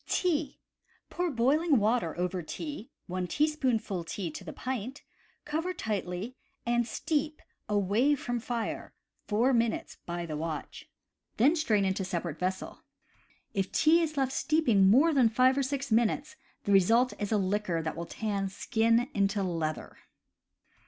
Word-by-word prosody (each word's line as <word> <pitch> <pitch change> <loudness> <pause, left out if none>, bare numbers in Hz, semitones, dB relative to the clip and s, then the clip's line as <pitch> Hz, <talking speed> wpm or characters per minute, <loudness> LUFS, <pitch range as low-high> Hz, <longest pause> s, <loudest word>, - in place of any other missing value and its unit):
Tea. 315 -6 0 0.3
— - - -38
Pour 355 0 -1
boiling 285 +4 +3
water 210 -6 +1
over 180 +1 -1
tea 270 - -6 0.2
(one 180 0 -3
teaspoonful 255 - 0
tea 165 +1 -4
to - - -8
the - - -7
pint), 255 +1 -5 0.4
cover 325 +5 -2
tightly, 205 +2 -3 0.3
and 240 0 +1
steep 305 +4 -1 0.3
awaij 210 +8 +2
from 245 -2 -3
fire 235 0 -4 0.3
four 235 +6 +2
minutes 230 -2 0
by 175 0 -3
the 160 - -5
ivatch. 155 0 -5 0.5
Then 275 +9 +5
strain 215 - +2
into 190 0 0
separate 170 -4 -3
vessel. 185 +1 -3 0.7
If 195 -1 -1
tea 325 +2 +4
is 310 -2 -2
left 265 -1 +1
steeping 245 -11 +3
more 290 +10 +5
than 255 -5 +5
five 255 +3 +4
or 280 - +1
six 275 -1 -3
minutes 240 +7 +1 0.3
the 200 - -1
result 225 +6 +4
is 205 0 -3
a 215 - +3
liquor 190 -4 0
that 160 - -3
will 170 +1 -5
tan 200 -3 -2
skin 230 +4 +1
into 200 0 +1
leather. 165 -4 -3
225 Hz, 150 wpm, -29 LUFS, 190-275 Hz, 0.7 s, Then